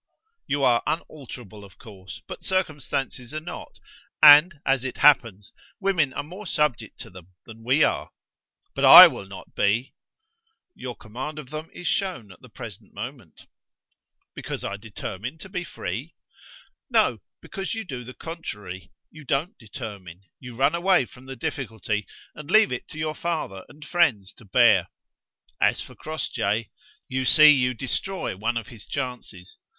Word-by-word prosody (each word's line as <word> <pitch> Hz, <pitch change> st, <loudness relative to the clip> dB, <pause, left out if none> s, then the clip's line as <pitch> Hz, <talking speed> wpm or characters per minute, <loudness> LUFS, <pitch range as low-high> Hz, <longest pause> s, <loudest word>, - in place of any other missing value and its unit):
You 145 Hz, -1 st, -1 dB
are 120 Hz, -3 st, +4 dB
unalterable, 125 Hz, -, -6 dB
of 100 Hz, -, -16 dB
course, 95 Hz, -5 st, -12 dB
but -, -, -9 dB
circumstances 145 Hz, -7 st, -2 dB
are -, -, -1 dB
not, 160 Hz, -, -9 dB, 0.5 s
and 150 Hz, +2 st, +9 dB
as 135 Hz, -2 st, +2 dB
it 130 Hz, -, -5 dB
happens, 115 Hz, -8 st, +3 dB, 0.3 s
women 180 Hz, -8 st, +1 dB
are 145 Hz, -, -3 dB
more 185 Hz, +7 st, -10 dB
subject 145 Hz, -10 st, -1 dB
to -, -, -10 dB
them 90 Hz, -2 st, -13 dB, 0.2 s
than 115 Hz, 0 st, -13 dB
we 130 Hz, +6 st, +3 dB
are." -, -, 0 dB, 0.6 s
"But -, -, -3 dB
I -, -, +13 dB
will 100 Hz, -, -7 dB
not 95 Hz, -1 st, -12 dB
be!" 110 Hz, +6 st, 0 dB, 0.8 s
"Your 125 Hz, -2 st, -7 dB
command 130 Hz, +7 st, -7 dB
of 145 Hz, -3 st, -9 dB
them 155 Hz, +1 st, -6 dB
is 175 Hz, -, -10 dB
shown 175 Hz, -, -2 dB
at 90 Hz, -, -17 dB
the -, -, -15 dB
present -, -, -10 dB
moment." -, -, -9 dB, 0.9 s
"Because -, -, -6 dB
I 100 Hz, -, -3 dB
determine 110 Hz, +4 st, -7 dB
to 190 Hz, -, -11 dB
be 180 Hz, -2 st, -3 dB
free?" -, -, -6 dB, 0.7 s
"No: -, -, +2 dB, 0.2 s
because 195 Hz, +3 st, -5 dB
you 225 Hz, -, -4 dB
do 130 Hz, -, -7 dB
the 125 Hz, +2 st, -11 dB
contrary; 105 Hz, -, -8 dB, 0.2 s
you 155 Hz, 0 st, -13 dB
don't 140 Hz, +7 st, -1 dB
determine: 100 Hz, -6 st, -9 dB, 0.2 s
you 125 Hz, -2 st, -10 dB
run 140 Hz, +5 st, +2 dB
away 175 Hz, -4 st, +3 dB
from 125 Hz, +2 st, -16 dB
the 135 Hz, -, -7 dB
difficulty, 110 Hz, -5 st, -4 dB, 0.3 s
and 150 Hz, -1 st, -11 dB
leave 215 Hz, -1 st, +5 dB
it 125 Hz, -, -5 dB
to -, -, -11 dB
your 155 Hz, 0 st, -2 dB
father 155 Hz, -, -4 dB
and 150 Hz, +1 st, -13 dB
friends 135 Hz, -, +1 dB
to 115 Hz, -, -18 dB
bear. 95 Hz, -, +4 dB, 0.7 s
As -, -, +3 dB
for -, -, -13 dB
Crossjay, 115 Hz, -8 st, -3 dB, 0.4 s
you 130 Hz, 0 st, -2 dB
see 155 Hz, +3 st, +8 dB
you 125 Hz, -3 st, +2 dB
destroy 140 Hz, -, -3 dB
one 115 Hz, +5 st, -2 dB
of 115 Hz, -, -5 dB
his 110 Hz, -3 st, -12 dB
chances. 115 Hz, -8 st, -6 dB
130 Hz, 160 wpm, -24 LUFS, 110-155 Hz, 0.9 s, I